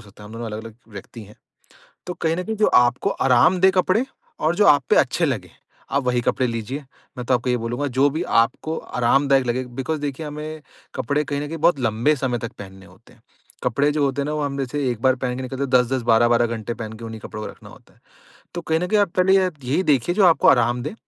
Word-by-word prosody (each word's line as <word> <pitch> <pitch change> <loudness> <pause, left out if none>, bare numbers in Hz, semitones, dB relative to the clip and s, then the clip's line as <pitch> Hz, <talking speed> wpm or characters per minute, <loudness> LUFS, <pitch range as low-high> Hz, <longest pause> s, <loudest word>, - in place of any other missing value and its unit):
सकता 100 +1 -16
है। - - -10
हम - - -12
दोनों 115 +1 -6
अलग 110 0 -6
अलग 115 -2 -10
व्यक्ति 110 +2 -10
हैं। 105 +2 -17 0.7
तो 180 - -4
कहीं 160 -1 -1
न 180 - -2
कहीं 220 - -3
जो 215 - +3
आपको 120 0 +3 0.2
आराम 145 +8 +4
दें 190 - +6
कपड़े 185 +5 +2 0.4
और 160 +2 +1
जो 210 - +4
आप 145 -1 +6
पे - - +5
अच्छे - - +2
लगें, - - -3 0.4
आप 140 0 +1
वही 125 -1 +1
कपडे 125 +1 0
लीजिए। 120 +5 -5 0.3
मैं 125 - -4
तो 130 - +3
आपको 125 +1 -1
ये 125 - +2
बोलूँगा, 120 +5 -3
जो 135 +2 +2
भी 160 +4 -3 0.2
आपको 155 +7 -4
आरामदायक 135 +2 +1
लगे, 125 +2 -1
बिकॉज़ 135 +5 -4
देखिए, 145 +1 -4
हमें 150 +1 -7 0.3
कपड़े 150 +1 -1
कहीं 140 +1 -3
न 145 - -4
कहीं 165 - -6
बहुत 160 0 +3
लंबे 115 +5 +1
समय 125 -3 -2
तक 115 -1 -6
पहनने 95 -1 -11
होते - - -20
हैं। - - -25 0.4
कपड़े 140 +4 +1
जो 145 -1 +1
होते 140 0 -1
हैं - - -4
ना, 150 - -2
वो 150 - -2
हम 140 -1 -3
जैसे 135 +1 -2
एक 120 -3 -4
बार 130 -1 +4
पहन 125 -1 -3
के 130 - -5
निकलते 130 +2 -5
हैं, 140 - -2
10-10, 125 0 +2
12-12 120 +1 +3
घंटे 115 +1 -5
पहन 110 -1 -7
के 110 +1 -10
उन्हीं 110 -1 -7
कपड़ों 105 0 -8
को - - -5
रखना - - -15
होता - - -19
है, - - -31 0.5
तो 175 - -3
कहीं 160 -1 0
न 180 - -1
कहीं 210 +2 +2
आप 200 -4 +1
पहले 190 +1 +5
य 185 -1 +1
यही 135 +9 0
देखिए, 150 0 +1
जो 200 -1 +4
आपको 165 - +4
आराम 120 -1 +3
दें। - - -5
130 Hz, 255 wpm, -22 LUFS, 120-150 Hz, 0.7 s, दें